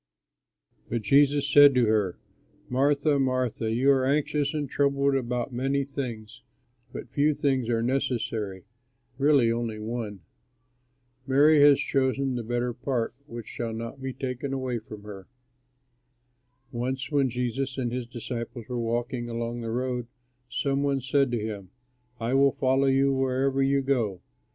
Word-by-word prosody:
But 115 -1 -2
Jesus 140 +5 +4
said 145 -1 +7
to 125 -2 +4
her, 105 -4 +1 0.5
"Martha, 140 +3 +2
Martha, 130 -4 0
you 130 +5 +3
are 135 -1 +3
anxious 145 +1 +1
and 150 -2 -2
troubled 140 0 +1
about 125 -1 -2
many 135 +3 0
things, 125 -6 -6 0.5
but 115 - -8
few 145 +2 +2
things 130 -5 0
are 115 -1 +1
necessary, 115 -6 -2 0.6
really 140 -5 +4
only 115 -2 -2
one. 110 -3 -5 1.1
Mary 145 +3 +5
has 145 -1 +7
chosen 135 0 0
the 120 - -2
better 120 +1 -2
part, 120 -1 -2
which 120 -4 -7
shall 115 -2 -4
not 115 +4 -6
be 130 0 -3
taken 130 +1 -4
away 130 -3 -2
from 110 -1 -11
her." 100 -3 -10 1.4
Once 130 +3 -3
when 140 -3 +2
Jesus 125 +2 -2
and 125 -3 -1
his 125 -1 -4
disciples 120 -1 -6
were 125 -1 -3
walking 120 +1 -2
along 120 +1 -3
the 115 - -4
road, 125 0 -2 0.4
some 140 +1 -1
one 140 -1 +1
said 135 +1 +2
to 120 -1 -1
him, 100 -4 -6 0.5
"I 115 +2 -1
will 135 0 +4
follow 135 +1 +2
you 135 +1 +3
wherever 135 +1 +1
you 135 0 +2
go." 115 -10 -1
130 Hz, 145 wpm, -27 LUFS, 115-135 Hz, 1.4 s, said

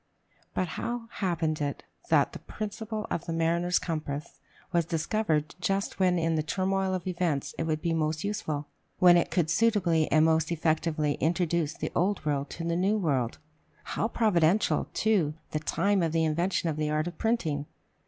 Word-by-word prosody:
But 185 - 0
how 235 -1 -3
happened 165 -5 -1
it 145 -1 -2 0.3
that - - +3
the - - -7
principle 215 0 -5
of - - -2
the 165 - -2
mariner's 170 +2 +2
compass 150 -3 -4 0.3
was 170 -1 +3
discovered 165 -1 0
just 195 +3 -1
when 180 -1 +3
in 165 -1 +1
the 155 - +1
turmoil 190 +3 0
of 180 - -5
events 175 -6 -1
it 165 - 0
would 155 -1 -1
be 170 -1 +1
most 155 -1 0
useful 155 -8 -3 0.3
when 175 -1 +7
it 175 - +3
could 170 -3 +1
suitably 175 -6 +2
and 155 0 +5
most 160 0 +2
effectively 155 -2 0
introduce 170 -1 +1
the - - -4
old 195 +3 +2 0.3
to 165 - -6
the 170 0 0
new 195 +5 +2
world? 135 - 0 0.5
How - - -1
providential, 205 -4 +2
too, 190 -9 +2 0.2
the 155 - -1
time 200 +5 +1
of 165 -2 0
the 165 -1 +2
invention 170 +3 0
of 155 -2 -1
the 155 -1 0
art 155 +1 0
of 175 -2 -7
printing! 160 -11 0
170 Hz, 175 wpm, -28 LUFS, 155-190 Hz, 0.5 s, when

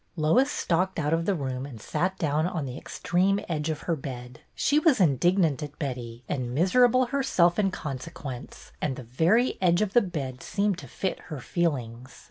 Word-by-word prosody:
Lois 180 - +3
stalked 185 - 0
out 150 -1 0
of 165 0 +1
the 200 - +2
room 130 -4 -3
and 135 -5 -8
sat 185 - -1
down 155 +1 +1
on 165 -5 -3
the 125 -1 -6
extreme 185 +6 0
edge 155 -2 -2
of 155 -1 -3
her 170 - -1
bed. 125 -3 -8 0.2
She 290 +2 +3
was 305 -6 +4
indignant 170 -1 +3
at 150 -1 -7
Betty 125 -4 -5
and 125 -3 -3
miserable 245 - +4
herself 235 -10 +2
in 195 -2 +3
consequence, 135 -5 -7
and 140 -4 -1
the 130 - -8
very 165 - +2
edge 175 +1 +4
of 205 -1 -3
the 240 - +6
bed 140 - -4
seemed 200 -2 0
to - - -10
fit 190 - -3
her 150 -4 -5
feelings. 125 -6 -3
160 Hz, 185 wpm, -27 LUFS, 135-190 Hz, 0.2 s, the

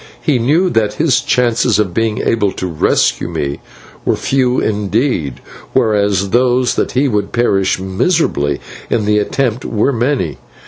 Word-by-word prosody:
He 145 -6 +1
knew 160 +10 +2
that 105 -2 +1
his 145 -4 +2
chances 120 -5 +1
of 100 -5 0
being 110 +1 0
able 105 -4 +1
to - - -4
rescue 85 -4 +1
me 70 0 -3 0.4
were - - +1
few 130 -2 +1
indeed, 105 - -1 0.3
whereas 100 -5 +1
those 125 0 +2
that - - -1
he 135 +3 +2
would 105 -5 -1
perish 100 -6 +1
miserably 95 - 0 0.3
in 110 - 0
the 105 0 +2
attempt 125 +3 -1
were 115 +5 0
many. 120 - -1
115 Hz, 145 wpm, -15 LUFS, 100-130 Hz, 0.4 s, knew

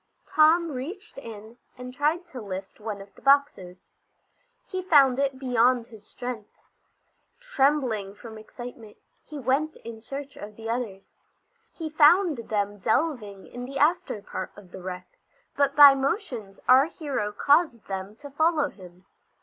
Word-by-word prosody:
Tom 320 +2 +4
reached 305 +7 -7
in 225 -1 -11 0.2
and 250 0 -8
tried 305 +6 0
to 270 -8 -9
lift 190 -1 -7
one 210 -2 -5
of 195 0 -14
the - - -19
boxes. 275 -11 +2 0.8
He 375 -1 -4
found 280 -8 +5
it 275 -1 0
beyond 250 -2 +2
his 220 -3 -15
strength. 245 -4 -7 0.8
Trembling 265 - 0
from 220 0 -11
excitement, 230 -1 -11 0.3
he 305 - -9
went 280 +4 0
in 225 -1 -8
search 275 +4 -7
of 210 +1 -9
the 225 +1 -8
others. 225 -5 -4 0.6
He 325 - -6
found 310 - +4
them 205 -1 -1
delving 220 - -1
in 245 0 -8
the 275 +2 -6
after 305 - +1
part - - -6
of 190 -4 -15
the 190 - -9
wreck, 180 0 -8 0.4
but 280 0 +1
by 285 -1 +10
motions 265 - -3
our 260 +2 +7
hero 280 -11 -3
caused 285 +1 +2
them 195 +1 -6
to 285 -1 -10
follow 310 0 +2
him. 180 -1 -15
250 Hz, 150 wpm, -26 LUFS, 210-290 Hz, 0.8 s, by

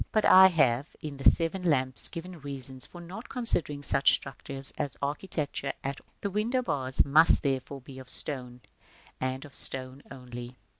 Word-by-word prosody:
But 215 - +2
I 190 0 +9
have, 140 -6 +2
in 145 -2 -6
the 135 - +6
"Seven 170 +3 -1
Lamps," 130 -7 +3
given 170 -1 -8
reasons 135 -2 -6
for 175 - -12
not 190 +7 -9
considering 170 - -2
such 140 - +3
structures 135 0 -8
as 145 -3 -4
architecture 145 -1 -3
at 135 0 -4
all. - - -36
The 200 - -3
window 230 +6 0
bars 130 - 0
must, 155 +4 +5
therefore, 135 0 -2
be 130 +1 -11
of 130 -1 -7
stone, 125 -4 -1 0.6
and 130 +2 -3
of 145 - -14
stone 130 +1 +3
only. 125 -2 -9
140 Hz, 165 wpm, -28 LUFS, 130-170 Hz, 0.6 s, I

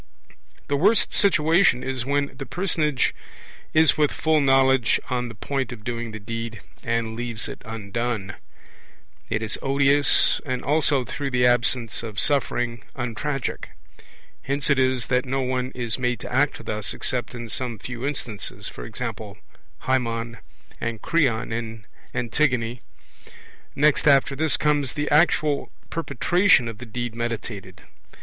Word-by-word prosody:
The 140 - +1
worst 205 +9 +3
situation 170 -7 +4
is 130 -1 -3
when 140 0 0
the 135 - -7
personage 160 -6 0 0.6
is 160 0 +4
with 150 -1 +3
full 155 -1 +2
knowledge 135 -3 +4
on 125 -1 0
the 115 - -9
point 135 +5 -3
of 115 -4 -9
doing 120 0 -3
the 110 - -7
deed, 115 +2 -5 0.2
and 115 -1 -1
leaves 115 -1 -3
it - - -8
undone. 110 -1 -3 1.0
It 110 +1 -1
is 110 - +3
odious 140 +1 +3
and 130 -3 -3
also 145 -2 +2
(through 140 +3 -4
the 125 -1 +2
absence 120 -1 +2
of 110 -3 -5
suffering) 120 -5 0
untragic; 130 +3 -3 0.8
hence 140 +1 -1
it 140 - +3
is 130 -2 +2
that 125 0 +1
no 135 +1 -1
one 130 0 -1
is 120 -3 -2
made 125 -3 0
to - - -7
act 135 -3 +1
thus 105 -1 -3
except 125 0 -2
in 120 -1 -6
some 120 0 -3
few 120 +2 -7
instances, 130 -7 -4
e.g. - - -5 0.8
Haemon 115 -3 -1 0.4
and 115 -1 -3
Creon 125 -9 +1
in 115 -2 -5 0.3
Antigone. 120 -1 0 0.9
Next 150 +1 +3
after 140 0 +5
this 155 +2 +3
comes 145 -3 +1
the 150 0 -2
actual 150 -2 +3 0.2
perpetration 165 - +3
of 115 -2 -7
the 120 - -9
deed 120 +1 -4
meditated. 115 -3 -5
125 Hz, 140 wpm, -24 LUFS, 115-140 Hz, 1.0 s, after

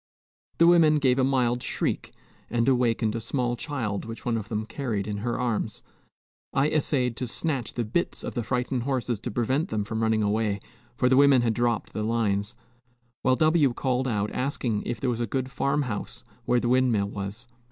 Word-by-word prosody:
The 170 - +6
women 165 -3 +6
gave 135 -3 +3
a - - +4
mild 125 -2 +2
shriek, - - -2 0.4
and 115 +1 +1
awakened 120 -4 +2
a 115 - -3
small 120 0 -1
child 120 -8 -3
which 115 0 -8
one 120 -2 +1
of 110 -3 -4
them 110 -1 -2
carried 115 -7 -3
in 105 -1 -3
her 115 +3 -2
arms. 115 -3 -2 0.7
I 140 +2 +3
essayed 130 -5 +1
to 125 - -3
snatch 135 -1 -2
the 120 - -1
bits 125 +11 -1
of - - -4
the 120 - -1
frightened 125 +2 -1
horses 125 -3 -1
to - - -5
prevent 130 - 0
them 105 -1 -1
from 110 +2 -3
running 110 -1 +2
away, 105 -1 0 0.4
for 125 - +2
the 130 0 +4
women 140 -3 +6
had 115 -2 +2
dropped 120 -1 -1
the 110 - -3
lines, 105 -1 0 0.7
while 130 0 +3
W 155 -3 +3
called 130 +1 0
out 105 -3 -1
asking 125 -5 -1
if 115 - -3
there 125 0 0
was 120 - -3
a 120 - -1
good 130 +4 -2
farm 140 +3 0
house 110 -6 -5 0.2
where 125 - +3
the 120 - -1
windmill 120 -6 +2
was. 100 +4 -6
120 Hz, 195 wpm, -26 LUFS, 110-130 Hz, 0.7 s, The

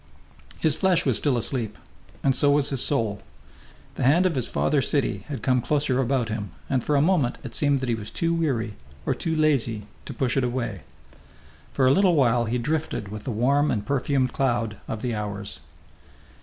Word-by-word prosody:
His 155 -2 +2
flesh 180 -2 +2
was 130 -5 +2
still 140 -5 +1
asleep, 115 -2 -2 0.5
and 135 - +3
so 145 +2 +2
was 145 0 +3
his 135 -3 +1
soul. 115 -8 0 0.8
The - - -1
hand 155 +9 +4
of 185 - +2
his 130 -5 -1
father 145 -2 +1
city 115 -9 -1
had 140 -3 -6
come 125 -2 +2
closer 140 -1 +1
about 130 -2 0
him, 110 -2 -4 0.2
and 130 -3 +1
for 150 - +1
a 140 - +4
moment 160 -8 +2
it 125 - -7
seemed 145 -1 +2
that 130 - -2
he - - +2
was 110 -2 -5
too 165 0 0
weary, 130 -10 -1 0.3
or - - +1
too 165 -2 -2
lazy, 135 -9 +1 0.2
to - - -6
push 130 -2 0
it 135 - +2
away. 120 -6 -2 0.9
For 135 - +1
a 130 - +6
little 185 +2 +4
while 120 -4 +3
he 115 +2 -1
drifted 140 -5 -2
with 105 0 -7
the 130 - -2
warm 140 +7 +2
and 105 -2 -1
perfumed 135 0 0
cloud 120 -7 0
of 110 - -5
the 125 -2 -1
hours. 105 -1 -5
130 Hz, 195 wpm, -25 LUFS, 115-145 Hz, 0.9 s, a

